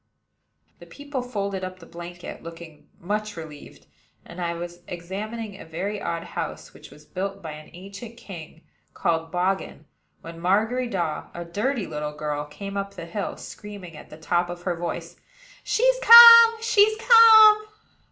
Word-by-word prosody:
The - - -14
people 285 -2 -7
folded 200 -6 -5
up 185 0 -6
the 170 - -15
blanket, 175 +1 -10
looking 165 -2 -12
much 210 +2 -4
relieved; 155 -3 -12 0.4
and 170 +1 -10
I 170 -1 -3
was 175 +1 -8
examining 200 +4 -7
a - - -9
very 190 +6 -5
odd 165 0 -4
house - - -7
which - - -15
was 150 - -18
built 195 +2 -6
by 160 - -6
an 150 0 -12
ancient 200 +6 -11
king 170 -7 -12 0.3
called 165 0 -2
Boggen, 180 -3 -3 0.4
when 165 0 -11
Margery 220 +8 0
Daw, 175 -8 -4
a 175 0 -7
dirty 210 +6 -2
little 150 0 -6
girl, 150 -1 -4
came 200 +7 -8
up 200 0 -5
the - - -8
hill, 195 +4 -5
screaming, 200 -5 -11
at 150 - -13
the 155 - -12
top 175 +2 -1
of 175 0 -8
her 180 -1 -2
voice: 170 0 -6 0.5
"She's - - +1
come! 465 -1 +10
she's 435 -1 +3
come!" 440 -2 +7
185 Hz, 160 wpm, -23 LUFS, 170-225 Hz, 0.5 s, come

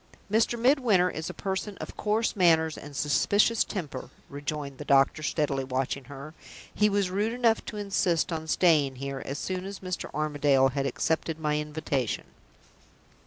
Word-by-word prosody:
"Mr. 225 +2 +2
Midwinter 230 -8 +3
is 160 +1 -5
a - - -3
person 195 +1 -4
of - - -8
coarse 215 +2 0
manners 160 -4 +4
and 145 -1 -10
suspicious 205 +10 +3
temper," 175 -9 -6 0.2
rejoined 145 -1 -5
the - - -5
doctor, 140 +2 +3
steadily 145 -3 0
watching 130 +1 -2
her. 140 +2 -9 0.4
"He 210 0 +3
was 200 -2 0
rude 210 +4 0
enough 235 -2 +2
to 210 - -6
insist 185 -5 0
on 160 0 -4
staying 155 -6 +3
here 135 +1 -5
as 135 - -5
soon 185 -1 -3
as 195 +1 -6
Mr. 185 -1 -5
Armadale 145 -3 +2
had 140 +1 -1
accepted 160 +2 -1
my 150 -1 0
invitation." 150 -5 -2
160 Hz, 160 wpm, -28 LUFS, 140-200 Hz, 0.4 s, manners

